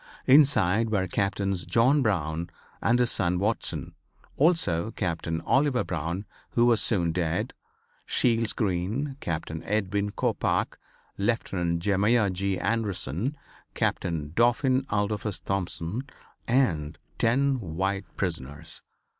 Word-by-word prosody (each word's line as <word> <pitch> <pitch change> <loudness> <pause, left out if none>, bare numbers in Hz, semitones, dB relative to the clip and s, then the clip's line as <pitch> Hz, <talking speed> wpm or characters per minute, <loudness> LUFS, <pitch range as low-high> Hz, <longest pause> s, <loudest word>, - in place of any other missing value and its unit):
Inside 115 -7 +5
were 100 -3 +1
Captains 100 -1 -1
John 130 - +3
Brown 85 - -1 0.3
and 120 - +3
his 125 -1 +2
son 90 -3 +1
Watson; 105 +5 -2 0.4
also 125 - +2
Captain 85 -5 -2
Oliver 135 -2 +2
Brown, 85 +3 -3 0.3
who 120 - +4
was 120 -2 +4
soon 85 -7 +2
dead; 90 +6 -1 0.5
Shields 115 -2 +2
Green, 110 +8 -1
Captain 80 -1 -4
Edwin 100 0 -1
Coppoc, - - -1 0.4
Lieutenant 90 -6 0
Jeremiah 105 +2 +3
G. 95 +1 -1
Anderson, 110 - -1 0.4
Captain 80 -4 -1
Dauphin 130 +4 +2
Adolphus 105 -1 -1
Thompson 95 +2 -2 0.5
and 80 - +1 0.2
ten 135 +3 +2
white 95 +2 -2
prisoners. 80 -4 -4
100 Hz, 105 wpm, -27 LUFS, 85-115 Hz, 0.5 s, Inside